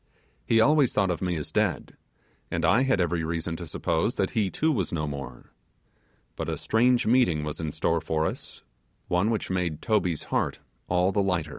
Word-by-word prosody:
He 115 - +4
always 145 +2 +4
thought 100 -3 +2
of 85 - -3
me 90 -2 -1
as 75 -2 -5
dead - - -1 0.5
and - - -1
I 115 - +4
had 135 -6 +2
every 85 -2 0
reason 80 +1 -2
to 85 - -7
suppose 80 - -1
that - - 0
he 105 -5 +1
too 160 - +1
was 100 - -1
no 75 -2 -1
more; 70 -4 -7 0.8
but - - -4
a - - -2
strange 120 +2 +2
meeting 110 -11 +3
was 75 -1 -4
in 80 -2 -3
store 85 +2 0
for 80 0 -1
us, - - -5 0.5
one 90 +5 +2
which 110 -4 -2
made 90 -4 -1
Toby's 90 -7 0
heart - - 0 0.3
all 90 +2 +2
th 90 -6 0
90 Hz, 185 wpm, -26 LUFS, 80-110 Hz, 0.8 s, He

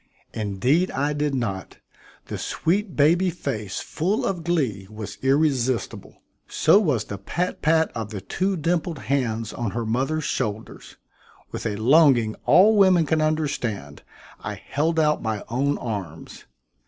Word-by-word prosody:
Indeed 120 - +1
I 145 +2 -1
did 145 -1 -1
not; 100 -7 -4 0.5
the - - -6
sweet 190 +3 -1
baby 170 +6 +4
face 130 - -4
full 190 +7 -1
of 180 -4 -2
glee 130 - -1
was 110 -1 -8
irresistible; 135 -3 0 0.2
so 200 - +4
was 145 - +1
the 100 - -7
pat 175 - -3
pat 160 +1 +2
of 110 -2 -5
the 105 -2 -5
two 185 - -2
dimpled 165 0 -1
hands 115 -5 -2
on 120 -3 -3
her 120 - -2
mother's 135 +8 -1
shoulders. 110 -6 -4 0.6
With - - -4
a 105 - -2
longing 120 -1 +4
all 210 +5 +6
women 185 -5 +5
can 155 +2 +1
understand, 135 - -2 0.4
I - - -4
held 160 +3 -1
out 150 -1 +2
my 110 -2 -3
own 140 +5 0
arms. 95 -9 -6
140 Hz, 140 wpm, -24 LUFS, 110-160 Hz, 0.6 s, all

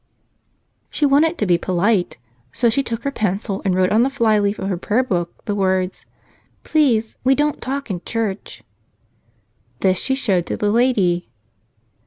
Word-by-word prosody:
She 300 - 0
wanted 300 +4 +3
to 210 - 0
be 175 -3 +2
polite. 185 - 0 0.3
So 235 - +1
she 275 - +1
took 230 -3 -5
her 280 - -1
pencil 200 -3 -2
and 190 -2 +1
wrote 185 0 +2
on 220 - +4
the 260 - +3
flyleaf 215 -6 +1
of 190 - -4
her 195 - -1
prayerbook 185 -3 -2
the 205 - -1
words, 190 -2 -1 0.6
"Please, 240 -8 +1
we 265 +2 +4
don't 295 +1 0
talk 275 -2 -4
in 175 -2 -4
church." 220 -4 -4 1.2
This 185 -1 +2
she 265 - 0
showed 195 -10 0
to - - -3
the 205 -1 0
lady. 205 - +1
210 Hz, 160 wpm, -20 LUFS, 185-255 Hz, 1.2 s, on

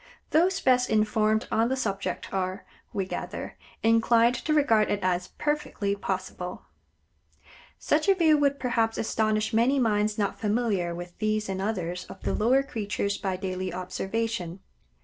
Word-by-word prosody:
Those 360 +4 +3
best 250 -1 +3
informed 215 0 +2
on 225 +2 +2
the 265 - +1
subject 195 -7 -3
are, 190 0 -2 0.3
we 195 - -2
gather, - - -5 0.3
inclined 230 +1 +4
to 275 +5 -3
regard 230 -8 +4
it 205 - 0
as 180 -1 0
perfectly 295 -9 -1
possible. 185 -2 -4 1.1
Such 310 +5 +1
a 390 - +6
view 325 -4 +5
would, 280 -1 +2
perhaps, 230 -3 0
astonish 215 -1 0
many 240 +5 +3
minds 215 -4 +1
not 205 -2 -1
familiar 205 -6 0
with 175 0 -8
these 215 0 0
and 190 -1 -3
others 180 -4 -2
of 190 - -11
the - - 0
lower 255 +5 +3
creatures 205 -5 -2
by 190 -2 -1
daily 185 -1 -3
observation. 190 0 -3
215 Hz, 150 wpm, -27 LUFS, 190-240 Hz, 1.1 s, a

